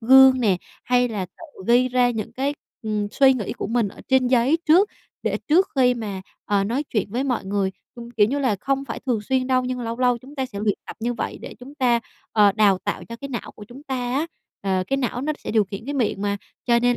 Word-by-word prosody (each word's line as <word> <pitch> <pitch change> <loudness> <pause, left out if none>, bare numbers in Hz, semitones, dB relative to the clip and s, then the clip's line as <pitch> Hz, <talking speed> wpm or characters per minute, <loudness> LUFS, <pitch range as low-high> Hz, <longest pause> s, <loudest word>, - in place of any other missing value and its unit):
gương 260 +2 +7
nè, 205 -6 +3 0.3
hay 245 +1 +3
là 205 -5 -3
tự 185 - -14 0.2
ghi 245 +2 +4
ra 250 -1 +3
những 220 -3 -4
cái, 275 +2 -1 0.3
ừm, 210 -2 -1
suy 270 +2 +5
nghĩ 235 -7 -3
của - - -4
mình 230 -1 +1 0.2
trên 265 -1 +4
giấy 255 +5 +3
trước 360 +6 +6 0.3
để - - 0
trước 360 +6 +4
khi 250 -2 +4
mà, 210 -5 -5 0.2
ờ, 200 -1 +1
nói 240 +8 0
chuyện 205 -3 -1
với 245 +5 -1
mọi 250 -7 -1
người. 195 0 0 0.2
Ưm, 235 -1 -9
kiểu 220 -4 +3
như 275 +6 -1
là 255 -7 +1
không 275 0 0
phải 240 - -6
thường 235 -4 +1
xuyên 255 +3 0
đâu, 255 -1 +2
nhưng 250 0 -3
lâu 230 0 -4
lâu 250 -1 +3
chúng 265 +5 -14
ta 265 -2 -2
sẽ 205 -5 -8
luyện 210 -2 +1
tập - - -8
như 240 +2 -1
vậy - - -4
để - - -8
chúng 270 +3 -11
ta, 245 -4 +2 0.3
ờ, 205 -2 +5
đào 200 -2 +4
tạo - - -4
cho 230 - -8
cái 275 +4 -7
não 240 -4 -5
của 210 - -10
chúng 260 +4 -11
ta 275 -3 -4 0.2
á, 290 +5 0 0.3
ờ, 190 -1 0
cái 275 - 0
não 245 -2 -1
nó 305 +2 0
sẽ - - -6
điều 215 -1 +3
khiển 195 +2 -7
cái 285 - -3
miệng 225 -7 0
mà. 200 0 0 0.3
Cho 235 -1 +5
nên 245 0 +2
245 Hz, 250 wpm, -23 LUFS, 215-265 Hz, 0.3 s, gương